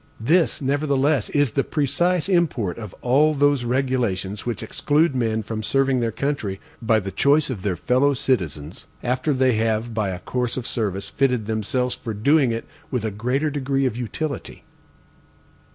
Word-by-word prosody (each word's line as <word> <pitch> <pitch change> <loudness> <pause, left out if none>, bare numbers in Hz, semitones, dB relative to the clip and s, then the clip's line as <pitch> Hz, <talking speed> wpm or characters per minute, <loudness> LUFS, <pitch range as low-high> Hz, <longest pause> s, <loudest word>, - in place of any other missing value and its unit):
This, 155 +6 +2
nevertheless, 140 -1 +1
is 145 -4 +2
the 135 - +1
precise 170 +4 +1
import 150 - +1
of 105 -4 -8
all 150 +5 +4
those 140 -3 +2
regulations 120 -6 -1
which 120 -4 -2
exclude 150 +1 +1
men 110 -3 0
from 110 +1 -4
serving 135 +3 +1
their 115 -1 0
country, 110 -6 -2 0.2
by 115 -1 +3
the 95 -1 -5
choice 140 - +3
of 105 -7 -5
their 95 -2 -1
fellowcitizens, 120 - 0 0.2
after 125 +5 0
they 130 -2 +3
have 110 +1 0
by 105 -3 0
a 90 - -3
course 125 +6 -3
of 125 - -3
service 100 -4 -2
fitted 125 -5 0
themselves 110 +4 -1
for 110 -2 -5
doing 140 +4 +3
it 115 0 -3 0.2
with 125 -4 -2
a 110 - -1
greater 125 +9 -1
degree 135 -1 0
of 125 -4 0
utility. 140 +5 -5
125 Hz, 160 wpm, -23 LUFS, 110-140 Hz, 0.2 s, all